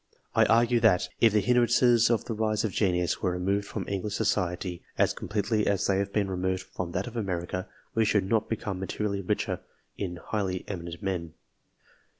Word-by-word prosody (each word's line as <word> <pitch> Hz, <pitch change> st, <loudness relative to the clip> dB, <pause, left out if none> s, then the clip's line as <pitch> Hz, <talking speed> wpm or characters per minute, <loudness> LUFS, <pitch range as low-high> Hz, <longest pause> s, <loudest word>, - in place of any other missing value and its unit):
I -, -, +5 dB
argue 120 Hz, +1 st, +4 dB
that, 90 Hz, -5 st, +3 dB
if 115 Hz, -, +6 dB
the 105 Hz, 0 st, +3 dB
hindrances 120 Hz, 0 st, +4 dB
to 115 Hz, -, +4 dB
the 115 Hz, -, -6 dB
rise 110 Hz, -1 st, 0 dB
of 110 Hz, -, 0 dB
genius, 90 Hz, -3 st, +1 dB
were 90 Hz, -, +1 dB
removed 100 Hz, +3 st, 0 dB
from -, -, -5 dB
English 100 Hz, +1 st, -2 dB
society 90 Hz, -4 st, -1 dB, 0.2 s
as -, -, +3 dB
com -, -, -8 dB
pletely 105 Hz, 0 st, +1 dB
as 100 Hz, -2 st, +1 dB
they 95 Hz, -1 st, +2 dB
have 100 Hz, 0 st, -1 dB
been 100 Hz, -1 st, +1 dB
removed 95 Hz, 0 st, -1 dB
from 85 Hz, -2 st, -6 dB
that 95 Hz, +2 st, -1 dB
of 125 Hz, -, -8 dB
America, 90 Hz, -4 st, -3 dB, 0.3 s
we 115 Hz, -, +3 dB
should 105 Hz, -2 st, +2 dB
not 110 Hz, +1 st, +1 dB
become 100 Hz, -4 st, -3 dB
materially 100 Hz, +1 st, -2 dB
richer 90 Hz, -, -1 dB, 0.4 s
in 90 Hz, -3 st, -3 dB
highly 95 Hz, 0 st, -3 dB
eminent 85 Hz, -1 st, -6 dB
men. 85 Hz, -4 st, -3 dB
100 Hz, 185 wpm, -28 LUFS, 90-110 Hz, 0.4 s, if